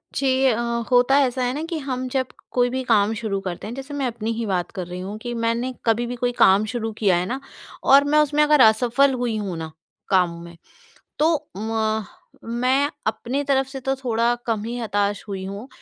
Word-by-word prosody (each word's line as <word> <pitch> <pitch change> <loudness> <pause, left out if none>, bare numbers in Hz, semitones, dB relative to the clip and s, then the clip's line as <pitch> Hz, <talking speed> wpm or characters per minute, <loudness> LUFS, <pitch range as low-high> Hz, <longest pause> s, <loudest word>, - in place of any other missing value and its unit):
जी 270 -1 +1 0.2
अ, 235 -3 +3 0.3
होता 250 +3 +5
ऐसा 255 0 -2
है 245 +1 0
ना 295 - -3
कि 335 -1 -4
हम 255 -2 -3
जब 260 -1 0 0.2
कोई 245 -1 +2
भी 260 +1 -2
काम 220 -3 +3
शुरू 205 -3 -2
करते 185 +2 -5
हैं, 230 - -6
जैसे 270 +2 -8
मैं 275 -3 -1
अपनी 230 -1 -3
ही 230 - -2
बात 180 -3 -1
कर 185 -4 -5
रही 180 +1 -6
हूँ 200 +3 -6
कि 240 +1 -5
मैंने 235 +2 -1
कभी 230 +1 +2
भी 245 - -4
कोई 245 0 -1
काम 195 +3 +5
शुरू 225 -2 -2
किया 195 -5 +3
है 175 - -1
ना, 255 +8 -3 0.4
और 275 +1 +7
मैं 300 +1 +3
उसमें 300 0 +3
अगर 300 -2 +5
असफल 245 +5 +4
हुई 240 -3 -1
हूँ 190 -5 -4
ना, 160 -1 -6 0.4
काम 180 -3 +3
में, 170 0 -12 0.6
तो 320 +2 +4 0.2
म 220 0 -1 0.4
मैं 255 +5 +1 0.2
अपनी 260 +5 -2
तरफ़ 270 -1 +1
से 270 0 -7
तो 270 +1 -1
थोड़ा 240 -2 +1
कम 220 -3 -1
ही 240 +1 -4
हताश 205 -2 -1
हुई 190 -2 -5
हूँ, 200 +6 -7
235 Hz, 210 wpm, -22 LUFS, 210-265 Hz, 0.6 s, और